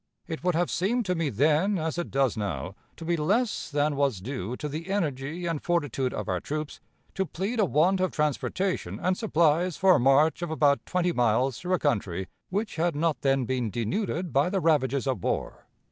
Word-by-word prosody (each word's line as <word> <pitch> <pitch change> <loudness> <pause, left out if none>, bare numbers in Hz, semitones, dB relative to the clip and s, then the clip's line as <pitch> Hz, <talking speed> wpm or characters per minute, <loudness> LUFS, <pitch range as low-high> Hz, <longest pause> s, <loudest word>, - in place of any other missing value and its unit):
It 160 -1 -5
would 180 -2 +1
have 175 +1 +1
seemed 225 +7 0
to 180 - +1
me 165 -4 -1
then, 155 - +2
as 160 +1 -2
it 175 - -3
does 135 -3 +1
now, 100 -3 -3 0.2
to 165 - -9
be 170 +1 +1
less 205 +9 0
than 145 0 +1
was 140 -7 +1
due 125 +1 -5
to 150 - -4
the 160 +5 -6
energy 160 -3 -2
and 165 -3 -2
fortitude 145 -7 0
of 105 - -4
our 90 -1 0
troops, 150 +5 -5 0.3
to 190 - 0
plead 195 +6 -3
a 210 - +5
want 180 +4 +2
of 185 0 +2
transportation 155 +5 -1
and 185 +1 +1
supplies 170 -3 +2
for 190 -1 +5
a - - +4
march 135 +6 +4
of 175 - -3
about 145 -3 +2
twenty 180 -1 +1
miles 125 -1 +1
through 185 0 0
a - - 0
country 95 - -1 0.2
which 205 +2 -2
had 170 -1 +1
not 160 +1 0
then 135 -2 +2
been 125 -2 -1
denuded 160 - -2
by 140 +5 +3
the 195 0 0
ravages 140 -6 +2
of 130 -9 -2
war. - - -3
155 Hz, 205 wpm, -27 LUFS, 135-180 Hz, 0.3 s, a